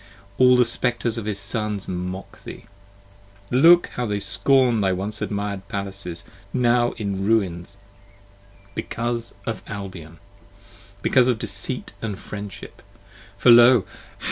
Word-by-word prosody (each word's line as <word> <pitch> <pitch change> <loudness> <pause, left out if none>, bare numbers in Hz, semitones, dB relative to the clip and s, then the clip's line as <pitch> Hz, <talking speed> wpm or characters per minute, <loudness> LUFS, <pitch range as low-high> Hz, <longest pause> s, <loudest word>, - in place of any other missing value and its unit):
all 125 -1 +6
the 125 - +5
Spectres 120 -1 -1
of 110 - -7
his 105 -2 -2
Sons 105 0 -3
mock 90 +1 -6
thee; - - -10 0.9
Look 165 +8 +6
how 125 -1 -3
they 105 -1 -1
scorn 125 0 +2
thy 95 -1 +2
once 100 +4 -3
admired 100 -1 -3
palaces, 100 -3 -4 0.3
now 120 0 +2
in 100 -3 -3
ruins 100 -4 0 1.0
Because 115 +2 -4
of 115 - -4
Albion; 95 -5 -8 0.9
because 130 -1 +4
of 125 -3 +2
deceit - - -5
and 105 -4 -4
friendship; 100 -1 -9 0.6
For 125 - +6
Lo! 120 -2 +7
105 Hz, 120 wpm, -23 LUFS, 100-120 Hz, 1.0 s, Lo